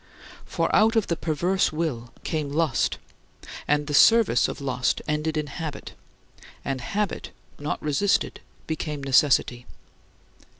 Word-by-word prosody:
For - - 0
out 225 +2 +4
of 220 -3 +3
the 170 - -1
perverse 175 +4 0
will 145 -8 -3
came 155 -3 -2
lust, 155 -3 +1 0.7
and 150 0 +2
the 145 - -4
service 220 - +5
of - - -6
lust 130 -2 0
ended 150 +1 -1
in 150 - -1
habit, 150 +1 -7 0.7
and 135 -2 -2
habit, 200 +8 -3 0.3
not 145 +1 -3
resisted, 150 +7 +1 0.3
became 150 -2 -4
necessity. 130 -3 +2
150 Hz, 125 wpm, -25 LUFS, 140-165 Hz, 0.7 s, service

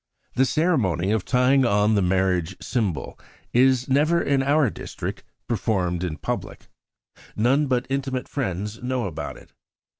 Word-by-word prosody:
"The 130 +1 +3
ceremony 115 - +1
of 110 -4 0
tying 130 +2 +3
on 105 -2 +3
the 100 - +3
marriage 95 -1 +1
symbol 110 -9 -2 0.3
is 130 0 +4
never 150 +5 +3
in 140 -4 +1
our 140 -3 +2
district - - -6 0.2
performed 95 -5 -1
in 80 -4 -3
public. - - -5 0.7
None 135 +7 +2
but 125 -1 0
intimate 135 -1 -2
friends 105 -4 -4
know 125 -1 -1
about 80 -5 -5
it. - - -18
120 Hz, 140 wpm, -24 LUFS, 95-135 Hz, 0.7 s, is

